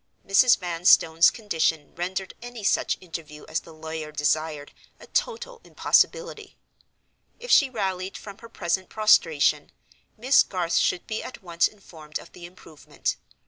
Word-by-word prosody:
Mrs. 230 +5 +5
Vanstone's 170 -2 +4
condition 160 - -2
rendered 185 +2 -4
any 240 -2 -9
such - - +1
interview 165 -4 -9
as 155 0 -1
the 165 - -15
lawyer 160 -1 -7
desired 150 0 -1 0.3
a - - -13
total 480 +1 -3
impossibility. 485 0 0 0.8
If - - -6
she 280 - +6
rallied 190 -5 -3
from 200 0 -11
her 230 - -13
present 185 -2 -2
prostration, 155 -8 +3 0.5
Miss 255 +5 +5
Garth 180 -3 -1
should 180 - +1
be 220 - -4
at 255 - -10
once 170 -1 +1
informed 160 -7 -10
of - - -14
the 175 -1 -11
improvement. 165 -4 -6
180 Hz, 140 wpm, -25 LUFS, 160-215 Hz, 0.8 s, she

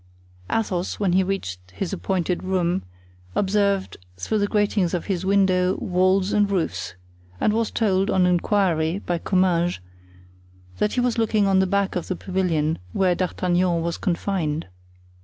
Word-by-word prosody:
Athos, 185 -5 -1
when 195 -4 +1
he 190 - +4
reached 185 - -3
his 195 0 -4
appointed 185 -1 -1
room, 185 -1 0 0.5
observed 200 -1 +1 0.2
through 210 - -1
the 205 - +1
gratings 205 -4 +1
of 175 - -3
his 190 -2 -2
window, 190 -2 +3
walls 185 +1 +1
and 205 -1 +3
roofs; 185 - -2 0.4
and 210 - +2
was 225 0 0
told, 195 -3 +1
on 185 -1 +3
inquiry, 175 -2 +1
by 175 -4 -2
Comminges, 180 -2 +1 1.0
that 210 - +1
he - - 0
was 245 -1 0
looking 215 -2 +2
on 195 -1 +3
the 190 - +3
back 200 +1 0
of 180 - -3
the 185 - -2
pavilion 170 -5 -1
where 185 -2 +2
D'Artagnan 180 -1 0
was 170 0 -3
confined. 170 -4 -1
185 Hz, 150 wpm, -23 LUFS, 175-200 Hz, 1.0 s, he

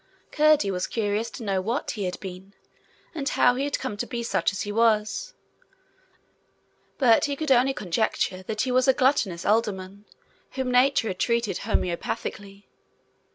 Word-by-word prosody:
Curdie 300 -9 +3
was 180 -1 -2
curious 215 0 -1
to 240 - -9
know 195 -3 0
what 230 +8 -2
he 205 -4 -4
had 180 - -4
been, 190 +1 -9 0.6
and 290 -4 -2
how 245 - +4
he 265 +3 -2
had 285 - -1
come 255 -6 -5
to - - -3
be 235 -1 -4
such 230 - 0
as 195 - -5
he 205 - -4
was: 215 -1 +1 1.6
but 255 +2 +4
he 285 -1 -2
could 310 0 -2
only 265 +1 +4
conjecture 185 0 -1
that 215 +3 -3
he 255 - -2
was 255 +1 +3
a 265 - +6
gluttonous 240 -10 +1
alderman 200 -2 -1 0.5
whom 260 -1 -2
nature 250 -2 +3
had 185 - -5
treated 235 -3 0
homeopathically. 200 0 -3
225 Hz, 160 wpm, -25 LUFS, 195-255 Hz, 1.6 s, a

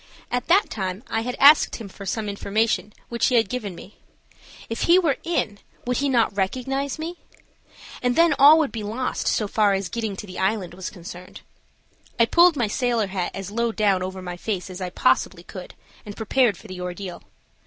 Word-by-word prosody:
At 245 0 -1
that 385 +4 +3
time 190 +1 -4
I 225 - 0
had 245 +2 -4
asked 290 +3 +7
him 225 - -7
for 200 +1 -10
some 215 +2 -2
information 210 +1 -1 0.2
which 235 0 +1
he 255 - +1
had 225 -3 +4
given 210 -7 -4
me. 200 - -13 0.7
If 230 - -2
he 345 - +8
were 325 -7 +2
in, 215 -12 -1 0.3
would 250 0 0
he 280 0 0
not 230 -5 +2
recognize 260 +8 -2
me? 330 +3 -5 0.8
And 245 -1 +1
then 335 -1 +5
all 290 +3 +9
would 310 -4 +1
be 225 - -5
lost 225 +5 -3
so 210 - +1
far 205 -1 +2
as 195 -1 -2
getting 220 -4 -3
to 200 - -7
the 185 -2 -8
island 190 -2 -1
was 185 0 -6
concerned. 180 0 -11 0.8
I 230 - +6
pulled 340 +7 +5
my 245 -5 +1
sailor 235 0 0
hat 185 -3 -1
as 195 0 -6
low 235 +1 0
down 205 -4 +1
over 185 0 -5
my 180 -1 -6
face 190 -2 -4
as 185 +1 -8
I 180 - -3
possibly 175 0 +1
could, 185 0 -10 0.3
and 205 -1 -9
prepared 225 -2 +2
for - - -17
the 185 -2 -7
ordeal. 180 0 -6
215 Hz, 200 wpm, -23 LUFS, 190-250 Hz, 0.8 s, all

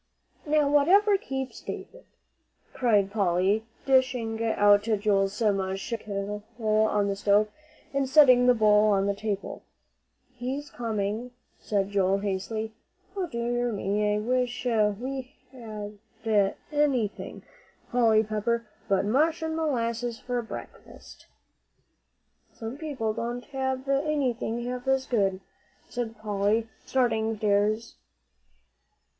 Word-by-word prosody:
"Now, 300 -1 +3
whatever 370 +9 +5
keeps 265 -8 -4
David!" - - -8 0.7
cried 210 -6 +2
Polly, 200 +1 +1 0.2
dishing 250 -4 +2
out 205 -2 +4
Joel's 205 -2 +1
mush 195 -3 0
from 230 - -1
the - - -18
kettle 205 0 -4 0.4
on 205 -1 +1
the 200 - -1
stove, 205 +1 +3 0.4
and 275 -1 0
setting 255 -4 +7
the 250 - +6
bowl 215 -1 +5
on 195 -1 +2
the 200 - +1
table. 200 -1 -4 0.7
"He's 260 +4 -5
coming," 220 0 -2 0.3
said 200 -1 -1
Joel, 195 -1 +2
hastily. 210 +3 -3 0.4
"O 380 -3 -2
dear 240 -3 -1
me, 210 0 0
I - - +1
wish 245 +2 -1
we 245 +4 -1 0.2
ever 215 -4 -7 0.3
had 205 -3 +2 0.2
anything, 275 -8 -1 0.5
Polly 225 -3 +4
Pepper, 225 +2 -1 0.2
but 195 0 +2
mush 315 +9 +2
and 320 0 -2
molasses 240 -6 -1
for 245 -1 -2
breakfast!" 225 - -11 1.2
"Some 225 +2 -7
people 275 -8 -3
don't 240 +2 -4
have 265 0 -2
anything 275 -5 0
half 250 +1 -5
as 265 0 +2
good," 195 -5 0 0.5
said 230 -2 -4
Polly, 210 +1 0 0.2
starting 225 -4 +1
for 215 - -5
the 200 -1 +4 0.2
stairs. 230 +1 -15
225 Hz, 120 wpm, -27 LUFS, 205-255 Hz, 1.2 s, setting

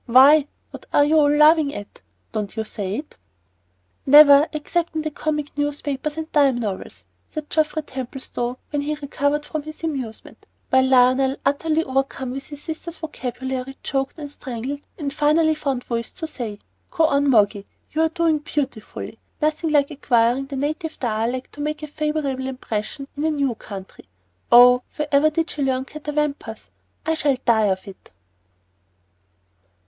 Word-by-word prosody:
Why, 275 +5 +7 0.2
what - - -11
are 290 - +5
you 310 +2 +4
all 290 -1 +5
laughing 300 0 +5
at? 205 - -9 0.3
Don't 210 -1 -4
you 220 - 0
say 205 -2 -4
it?" 295 +5 -7 0.9
"Never, 290 +1 +9
except 335 +2 -2
in 315 - -1
the 310 - -3
comic 300 0 -3
newspapers 290 0 -2
and 320 0 -5
dime 280 -4 +4
novels," 210 -5 -5 0.2
said 310 -1 -7
Geoffrey 310 0 +1
Templestowe 255 -2 -5
when 290 -1 0
he 300 +1 -2
recovered 285 0 -1
from 310 0 -3
his 310 +2 -10
amusement, 265 -9 -5 0.2
while 260 0 +5
Lionel, 260 +1 +4
utterly 310 +3 +1
overcome 265 -1 -2
with 270 +1 -6
his 290 -1 -10
sister's 325 +1 -6
vocabulary, 260 -3 -5
choked 270 +2 -2
and 290 -2 -7
strangled, 265 +1 -5 0.2
and 285 -3 -3
finally 315 +2 +3
found 275 -5 -2
voice 235 -1 -3
to 330 - -5
say, 235 -9 -5 0.3
"Go 330 -3 +2
on, 285 -2 +2
Moggy. 205 -4 +3 0.2
You're 320 +1 +2
doing 325 -2 +1
beautifully. 275 -7 -5 0.2
Nothing 310 +1 0
like 290 -1 +3
acquiring 250 -2 +2
the 275 - -6
native 310 +4 -3
dialect 235 +2 -2
to 290 - -8
make 305 +1 -3
a - - -4
favorable 295 -3 -2
impression 255 +1 -4
in 290 - -3
a 315 - +2
new 280 -5 0
country. 195 -3 -10 0.5
Oh, 250 +1 +8
wherever 300 0 +3
did 325 +2 -1
she 295 - -5
learn 260 -1 0
'catawampus'? 295 -6 -4 0.3
I 320 - +1
shall 290 -4 +1
die 220 -3 +4
of 190 0 -2
it." 195 - -12
285 Hz, 155 wpm, -22 LUFS, 255-305 Hz, 0.9 s, Never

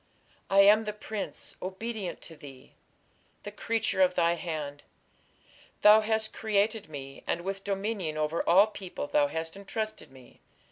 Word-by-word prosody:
I 195 +1 +6
am 210 +2 +6
the 210 - -3
prince, 210 0 -6
obedient 195 +1 -5
to 165 - -10
thee, 135 -3 -13 0.7
The 205 - -6
creature 225 -2 -1
of 180 -1 +4
thy 170 -1 +3
hand; 155 -4 -5 1.0
Thou 210 +1 +8
hast 220 0 -1
created 215 -2 0
me, 135 -2 -9
and 170 - -1
With 195 +2 -4
dominion 195 -5 -2
over 155 +2 0
all 190 +4 +7
people 195 -7 -6
Thou 145 0 +2
hast 160 +3 -5
entrusted 215 +2 -5
me. 130 -2 -17
195 Hz, 145 wpm, -29 LUFS, 160-215 Hz, 1.0 s, Thou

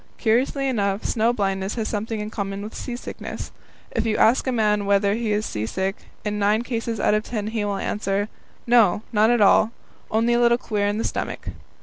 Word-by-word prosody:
Curiously 260 +4 +1
enough, 200 -5 0
snow 230 +1 +2
blindness 195 -3 -1
has 225 -2 -2
something 220 +1 -3
in 210 +1 -5
common 200 -1 -4
with 215 - -7
seasickness. 245 -1 -6 0.4
If - - 0
you 220 -1 0
ask 240 +4 +4
a - - +2
man 210 -3 +1
whether 200 0 +3
he 225 0 -1
is 210 +1 0
seasick, 190 - -2 0.3
in 210 0 -1
nine 210 +3 +2
cases 230 -2 -3
out - - +3
of 215 - +2
ten 215 -2 -4
he 220 0 -2
will 200 -1 -1
answer: 200 0 -1 0.4
"No, 230 -4 +4
not 215 +1 +4
at 240 -2 +3
all 210 +2 +5 0.4
only 230 +2 +2
a 240 - +3
little 235 0 +4
queer 210 -4 -1
in 205 +1 0
the 225 - -1
stomach." - - -3
215 Hz, 200 wpm, -23 LUFS, 205-230 Hz, 0.4 s, all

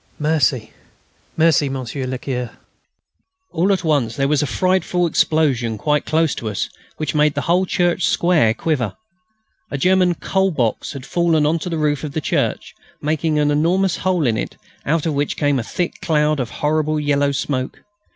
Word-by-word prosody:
"Merci,... 145 -7 0 0.6
merci, 155 -3 +3
Monsieur 130 0 -4
le 130 0 -3
Curé." 125 -2 -4 1.0
All 185 +5 +1
at 190 -2 0
once 140 -8 +1
there 135 -1 +1
was 150 +1 +2
a 145 - 0
frightful 180 +4 +1
explosion 140 -9 +1
quite 150 +6 0
close 160 -1 +2
to 110 - -4
us, 105 - -3 0.3
which 155 - -2
made 150 -1 +2
the 145 - -1
whole 180 +4 +1
church 175 0 +1
square 170 -11 +3
quiver. 135 -10 -1 0.7
A 140 - -3
German 180 +2 +3
"coal 190 +3 0
box" 120 - -1
had 135 -2 -8
fallen 165 -3 +2
on 160 +3 +1
to 180 - -5
the 165 - -2
roof 150 -2 0
of 150 -2 -5
the 155 - -1
church, 150 - -1 0.3
making 155 +1 0
an 150 0 +2
enormous 175 +5 +2
hole 180 -5 0
in 115 -3 +1
it, - - -5 0.3
out 160 +2 +1
of 160 - 0
which 145 0 -1
came 145 -2 +1
a - - -3
thick 175 +9 -3
cloud 150 -2 +1
of 125 -3 -2
horrible 155 +2 0
yellow 145 -1 +1
smoke. 135 -2 -3
150 Hz, 180 wpm, -20 LUFS, 135-165 Hz, 1.0 s, merci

